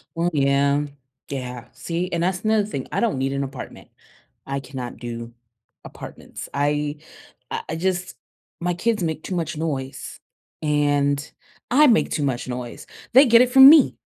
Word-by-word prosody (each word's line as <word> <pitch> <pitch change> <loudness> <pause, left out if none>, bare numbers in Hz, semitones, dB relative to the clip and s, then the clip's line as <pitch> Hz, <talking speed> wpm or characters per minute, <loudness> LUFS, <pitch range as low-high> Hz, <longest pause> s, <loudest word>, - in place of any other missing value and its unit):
Well, 170 +1 +1
yeah. 140 +1 +2 0.4
Yeah. 125 -3 -6
See, 175 +2 -3
and 170 0 -1
that's 180 +1 -1
another 215 -1 +2
thing. 140 -11 -5
I - - -1
don't 230 - +1
need 135 +1 -1
an 140 0 -1
apartment. 135 -1 -9 0.6
I 140 0 -3
cannot 130 -2 -7
do 115 -1 -7 0.5
apartments. - - -10
I 145 +1 0 0.5
I - - -2
I 160 - -2
just 185 +1 -2 0.4
my 175 0 0
kids 210 +2 0
make 160 -1 -3
too 185 - -4
much 165 -2 -2
noise, 135 -4 -4 0.4
and 145 -1 +1 0.4
I 295 +3 +6
make 230 - +3
too 150 - -1
much 130 -2 -2
noise. 125 -1 -6 0.3
They 270 +3 +8
get 235 0 +6
it 250 - +3
from 265 +1 +10
me. 305 -3 +6
150 Hz, 160 wpm, -22 LUFS, 135-185 Hz, 0.6 s, from